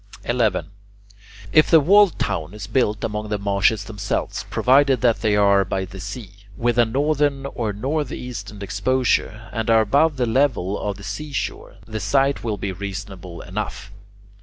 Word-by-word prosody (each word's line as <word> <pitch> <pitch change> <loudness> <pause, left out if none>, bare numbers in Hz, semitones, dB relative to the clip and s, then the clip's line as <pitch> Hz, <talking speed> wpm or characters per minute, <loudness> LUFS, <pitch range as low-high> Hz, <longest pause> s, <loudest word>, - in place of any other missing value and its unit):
11. 115 -6 0 0.8
If 155 - +5
the 165 - +7
walled 195 +4 +5
town 80 +4 -3
is 105 -2 -6
built 105 -5 0
among 105 -1 -3
the 105 - 0
marshes 100 +1 +1
themselves, 105 -1 -3
provided 135 -1 +3
they 110 -3 +2
are 100 -1 +4
by 95 +1 -2
the 95 +1 -10
sea, 100 0 -7 0.3
with 120 0 +1
a 120 - +6
northern 140 +2 0
or 115 -5 -3
north 135 +7 -2
eastern 105 -4 -7
exposure, 110 +2 0
and 115 -1 -2
are 115 -1 +6
above 140 +7 +2
the 125 - +1
level 115 -6 +1
of 100 -2 -3
the 100 - -12
seashore, 140 +9 -5
the 110 -1 -5
site 135 +4 +1
will 110 -3 -2
be 100 0 -3
reasonable 95 -2 -7
enough. 100 +1 -5
110 Hz, 160 wpm, -22 LUFS, 100-130 Hz, 0.8 s, the